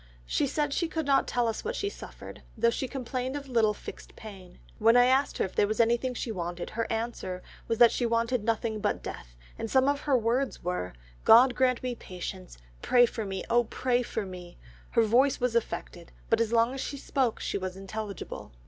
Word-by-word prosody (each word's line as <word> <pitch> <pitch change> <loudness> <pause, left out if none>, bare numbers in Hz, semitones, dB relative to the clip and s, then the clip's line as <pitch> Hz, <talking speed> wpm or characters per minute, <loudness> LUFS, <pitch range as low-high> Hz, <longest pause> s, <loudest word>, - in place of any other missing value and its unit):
She 280 - 0
said 295 +1 -1
she 340 - 0
could 320 -1 -3
not 275 -1 +3
tell 245 -1 +1
us 225 - -3
what 470 +2 -3
she 405 - -2
suffered, 405 - -9 0.2
though 235 +1 +3
she 265 - -2
complained 255 0 -4
of 285 -1 -5
little 225 -4 +2
fixed - - -10
pain. 195 -4 -11 0.2
When 230 +2 +5
I 245 - +7
asked 265 +2 +2
her - - +1
if 190 - -8
there 205 - +3
was 215 +2 -2
anything 235 +2 +2
she 235 - -3
wanted, 175 -3 -4
her 230 +1 -3
answer 225 -5 -3 0.2
was 230 - -1
she 240 - 0
wanted 230 0 0
nothing 225 -1 -1
but - - -1
death, - - -8 0.2
and 225 - -3
some 265 +2 +3
of 285 0 +2
her 285 -3 +2
words 245 +4 -1
were, 175 - -3 0.3
'God 245 +3 +7
grant 255 -1 +1
me 250 -1 -1
patience; 185 - -8 0.2
pray 245 -1 +5
for 225 -2 -4
me, 195 -1 -4
oh, 240 +1 +3
pray 250 +2 0
for 225 -3 -3
me!' 180 -2 -10 0.3
Her 230 - +3
voice 250 +5 +3
was 245 -1 0
affected, 175 -6 -3 0.2
but 225 0 +4
as 230 -1 0
long 230 +2 +3
as 270 - -4
she 285 - -4
spoke 260 -3 -1
she - - -2
was 185 0 -5
intelligible. 200 0 -6
230 Hz, 210 wpm, -28 LUFS, 210-255 Hz, 0.3 s, I